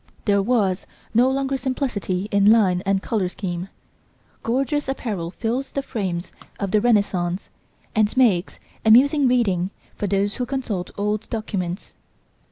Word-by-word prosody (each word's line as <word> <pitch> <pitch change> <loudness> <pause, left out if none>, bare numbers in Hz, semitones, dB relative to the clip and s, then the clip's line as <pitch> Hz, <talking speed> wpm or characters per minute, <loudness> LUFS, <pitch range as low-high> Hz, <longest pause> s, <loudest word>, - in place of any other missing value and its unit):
There 200 -1 +3
was 200 -4 +1 0.3
no 245 +3 +5
longer 270 0 0
simplicity 240 -8 -2
in 200 +1 +5
line 190 -6 +4
and 195 -1 +1
colour 200 -5 0
scheme; 180 -1 -5 0.7
gorgeous 275 +5 0
apparel 210 -10 -3
fills 235 +8 -3
the 275 - -2
frames 190 -9 -3 0.3
of 200 -2 -2
the 210 - +3
Renaissance 200 -5 +1 0.4
and 215 +2 +1
makes 205 -9 +3 0.3
amusing 270 +6 +6
reading 195 -8 +2 0.2
for 205 - -3
those 200 +1 0
who 250 -1 -2
consult 235 -9 -3
old 210 +1 -1
documents. 195 -5 -4
210 Hz, 135 wpm, -23 LUFS, 190-250 Hz, 0.7 s, amusing